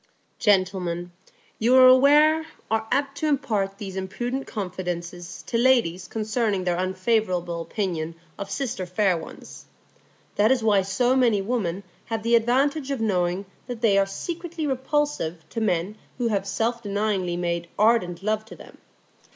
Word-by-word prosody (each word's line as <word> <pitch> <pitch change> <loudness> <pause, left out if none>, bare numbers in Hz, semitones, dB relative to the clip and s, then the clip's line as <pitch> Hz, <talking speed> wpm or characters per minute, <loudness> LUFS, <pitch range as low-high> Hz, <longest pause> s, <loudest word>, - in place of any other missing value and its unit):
Gentlemen, 185 -4 +1 0.5
you 240 +3 +4
are 260 0 +8
aware, 295 +5 +6 0.2
are 220 0 0
apt 280 0 0
to 310 - 0
impart 220 -9 0
these 195 -2 -7
imprudent 240 +8 -3
confidences 180 -3 -5
to 230 - -1
ladies 230 -9 +2
concerning 215 -2 -1
their 175 -1 0
unfavourable 185 -2 0
opinion 165 -2 -3 0.2
of 200 - -5
sister 240 -9 -3
fair 185 +1 +2
ones. 165 - -10 0.7
That 215 +4 +4
is 255 -3 +2
why 205 -3 +4
so 220 +7 +1
many 240 -6 +3
women 195 -3 -2 0.2
have 225 -1 -3
the 235 +1 +1
advantage 265 +5 +2
of 275 -3 -2
knowing 185 -3 0 0.2
that 245 -3 -6
they 220 -4 +4
are 195 0 +3
secretly 335 - -5
repulsive 265 - -1
to 225 - -4
men 195 0 -1 0.2
who 240 -2 0
have 200 -2 -1
self 230 +4 -1
denyingly 200 -4 -1
made 170 -1 -2
ardent 205 -5 +2
love 215 +1 0
to - - -11
them. - - -15
210 Hz, 150 wpm, -24 LUFS, 185-245 Hz, 0.7 s, are